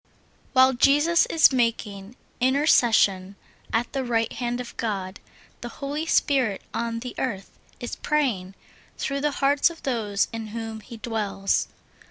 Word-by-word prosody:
WHILE 260 Hz, 0 st, +6 dB
Jesus 295 Hz, +7 st, +4 dB
is 315 Hz, -4 st, +5 dB
making 230 Hz, -3 st, -1 dB, 0.2 s
intercession 235 Hz, -8 st, +3 dB, 0.4 s
at 230 Hz, +1 st, -1 dB
the 270 Hz, -, -1 dB
right 230 Hz, -2 st, 0 dB
hand 245 Hz, 0 st, -3 dB
of 250 Hz, -, -7 dB
God, 195 Hz, -4 st, -4 dB, 0.4 s
the 240 Hz, -, -6 dB
Holy 290 Hz, +6 st, -4 dB
Spirit 260 Hz, -11 st, +1 dB
on 230 Hz, 0 st, -2 dB
the 250 Hz, 0 st, -6 dB
earth 195 Hz, -7 st, -3 dB, 0.3 s
is 240 Hz, -, -6 dB
praying 230 Hz, -11 st, -1 dB, 0.4 s
through 275 Hz, 0 st, -2 dB
the 295 Hz, -, +2 dB, 0.2 s
hearts 285 Hz, +3 st, +4 dB
of 335 Hz, -1 st, -12 dB
those 215 Hz, -6 st, 0 dB
in 225 Hz, -1 st, -5 dB
whom 225 Hz, -1 st, -5 dB
He 230 Hz, +2 st, -11 dB
dwells. 215 Hz, -4 st, -1 dB
240 Hz, 140 wpm, -25 LUFS, 215-275 Hz, 0.4 s, WHILE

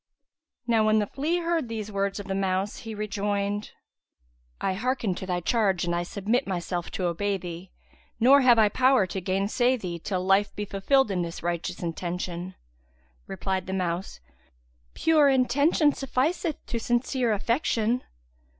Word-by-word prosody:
'" 320 Hz, -, -64 dB, 0.2 s
Now 225 Hz, -2 st, +3 dB
when 215 Hz, 0 st, +4 dB
the 210 Hz, -, +2 dB
flea 315 Hz, -, -1 dB
heard 335 Hz, -7 st, -1 dB
these 215 Hz, -2 st, -5 dB
words 200 Hz, 0 st, -1 dB
of 205 Hz, -, -6 dB
the 195 Hz, -, -3 dB
mouse, 195 Hz, +1 st, -1 dB
he 225 Hz, -3 st, -7 dB
rejoined, 205 Hz, 0 st, -2 dB, 0.9 s
"I 190 Hz, -, 0 dB
hearken 235 Hz, -1 st, -1 dB
to 185 Hz, -, -7 dB
thy 180 Hz, -1 st, -1 dB
charge 195 Hz, -1 st, +1 dB
and 175 Hz, -, -1 dB
I 175 Hz, -, 0 dB
submit 210 Hz, +8 st, -1 dB
myself 175 Hz, -2 st, -3 dB
to 185 Hz, -, -2 dB
obey 195 Hz, +4 st, 0 dB
thee, 180 Hz, 0 st, -8 dB, 0.5 s
nor 270 Hz, +4 st, +6 dB
have 245 Hz, -2 st, +6 dB
I 220 Hz, -1 st, +6 dB
power 255 Hz, 0 st, +3 dB
to 190 Hz, +1 st, -5 dB
gainsay 200 Hz, +7 st, +1 dB
thee, 175 Hz, -6 st, -5 dB
till 185 Hz, +1 st, -3 dB
life 195 Hz, +2 st, +3 dB
be 210 Hz, -, -3 dB
fulfilled 210 Hz, +5 st, +2 dB
in 180 Hz, -2 st, 0 dB
this 170 Hz, -1 st, -5 dB
righteous 175 Hz, +1 st, -3 dB
intention." 175 Hz, +1 st, -4 dB, 0.7 s
Replied 190 Hz, -1 st, -3 dB
the 190 Hz, -, -3 dB
mouse, 180 Hz, -, -2 dB, 0.8 s
"Pure 310 Hz, -3 st, +4 dB
intention 285 Hz, +4 st, +3 dB
sufficeth 295 Hz, +4 st, -1 dB
to 235 Hz, -, -3 dB
sincere 240 Hz, +1 st, 0 dB
affection." 230 Hz, +1 st, 0 dB
205 Hz, 160 wpm, -26 LUFS, 185-250 Hz, 0.9 s, nor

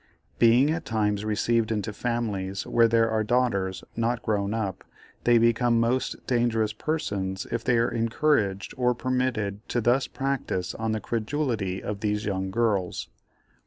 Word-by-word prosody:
Being 120 Hz, +5 st, +5 dB
at 165 Hz, +1 st, -2 dB
times 105 Hz, -2 st, 0 dB
received 110 Hz, +1 st, +1 dB
into 105 Hz, -1 st, -2 dB
families 105 Hz, -5 st, -2 dB
where 115 Hz, -1 st, +4 dB
there 115 Hz, 0 st, +3 dB
are 110 Hz, -1 st, +1 dB
daughters, 105 Hz, -6 st, 0 dB
not 115 Hz, +1 st, -1 dB
grown 100 Hz, -2 st, 0 dB
up, 110 Hz, -4 st, -3 dB, 0.4 s
they 120 Hz, -1 st, +6 dB
become 115 Hz, +1 st, +3 dB
most 120 Hz, +3 st, -1 dB
dangerous 115 Hz, -4 st, +1 dB
persons 100 Hz, -, -2 dB
if 115 Hz, -, -2 dB
they 125 Hz, -2 st, +2 dB
are 115 Hz, -, +2 dB
encouraged 115 Hz, -4 st, 0 dB
or 125 Hz, -1 st, +2 dB
permitted 120 Hz, -5 st, -1 dB
to 120 Hz, -, 0 dB
thus 120 Hz, +4 st, +2 dB
practise 135 Hz, -9 st, -2 dB
on 110 Hz, -1 st, -2 dB
the 110 Hz, -, -1 dB
credulity 115 Hz, -5 st, -2 dB
of 105 Hz, -1 st, -4 dB
these 105 Hz, 0 st, -1 dB
young 95 Hz, -2 st, -2 dB
girls. 100 Hz, -4 st, 0 dB
115 Hz, 150 wpm, -26 LUFS, 105-120 Hz, 0.4 s, they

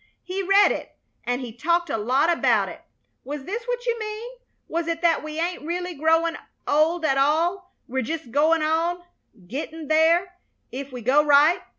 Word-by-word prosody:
He 370 Hz, +2 st, -3 dB
read 390 Hz, +2 st, +5 dB
it, -, -, -6 dB, 0.3 s
and 245 Hz, +2 st, -1 dB
he 240 Hz, -3 st, -7 dB
talked 340 Hz, +7 st, 0 dB
a -, -, 0 dB
lot 260 Hz, +10 st, +2 dB
about -, -, +2 dB
it. -, -, -10 dB, 0.4 s
Was 285 Hz, 0 st, -6 dB
this 435 Hz, -, -4 dB
what -, -, -3 dB
you 475 Hz, -1 st, 0 dB
mean? 435 Hz, +2 st, -5 dB, 0.4 s
Was 335 Hz, 0 st, -2 dB
it 330 Hz, -1 st, -2 dB
that 335 Hz, -2 st, +3 dB
we 310 Hz, +1 st, -5 dB
ain't 345 Hz, +2 st, -2 dB
really 355 Hz, +3 st, -3 dB
growin' 325 Hz, +2 st, +1 dB, 0.3 s
old 315 Hz, +3 st, +2 dB
at 270 Hz, -3 st, +2 dB
all, 340 Hz, +6 st, +1 dB
we're 265 Hz, +1 st, -2 dB
jest 300 Hz, 0 st, -5 dB
goin' 310 Hz, +4 st, +3 dB
on, 335 Hz, +3 st, 0 dB, 0.4 s
gettin' 305 Hz, -, -6 dB
there, 340 Hz, +4 st, +3 dB, 0.3 s
if 275 Hz, +1 st, -6 dB
we 250 Hz, -1 st, -7 dB
go 275 Hz, +6 st, +4 dB
right? 300 Hz, +4 st, +5 dB
325 Hz, 180 wpm, -24 LUFS, 285-350 Hz, 0.4 s, read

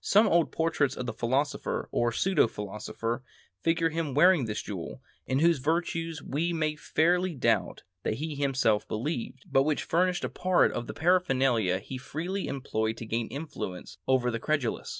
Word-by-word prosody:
Some 210 Hz, +3 st, +5 dB
old 170 Hz, -5 st, +3 dB
portraits 160 Hz, -4 st, 0 dB
of 125 Hz, -, -3 dB
the 120 Hz, -, -3 dB
philosopher, 130 Hz, +6 st, -1 dB
or 120 Hz, 0 st, +1 dB
pseudo 180 Hz, +1 st, +3 dB
philosopher, 110 Hz, +3 st, -4 dB, 0.4 s
figure 165 Hz, 0 st, +2 dB
him 160 Hz, -4 st, -2 dB
wearing 175 Hz, -2 st, +5 dB
this 110 Hz, -1 st, -3 dB
jewel, 95 Hz, +2 st, -6 dB, 0.3 s
in 130 Hz, -, +1 dB
whose 165 Hz, 0 st, +4 dB
virtues 165 Hz, +1 st, -1 dB
we 165 Hz, +5 st, -1 dB
may 155 Hz, -2 st, 0 dB
fairly 175 Hz, +3 st, +1 dB
doubt 115 Hz, -5 st, 0 dB, 0.2 s
that 110 Hz, -, -1 dB
he 155 Hz, +5 st, -4 dB
himself 130 Hz, -7 st, +1 dB
believed, 125 Hz, +2 st, -4 dB
but 135 Hz, -, +5 dB
which 150 Hz, +1 st, 0 dB
furnished 180 Hz, +1 st, +1 dB
part 185 Hz, -1 st, +3 dB
of 120 Hz, -, -4 dB
the -, -, -6 dB
paraphernalia 135 Hz, -, +2 dB
be 130 Hz, -, -5 dB
freely 175 Hz, +9 st, -4 dB
employed 110 Hz, -4 st, -2 dB
to 115 Hz, -, -6 dB
gain 115 Hz, +1 st, -1 dB
influence 140 Hz, -, -6 dB
over 125 Hz, -2 st, +3 dB
the 115 Hz, -, -2 dB
credulous. 145 Hz, -4 st, -1 dB
140 Hz, 165 wpm, -28 LUFS, 120-165 Hz, 0.4 s, Some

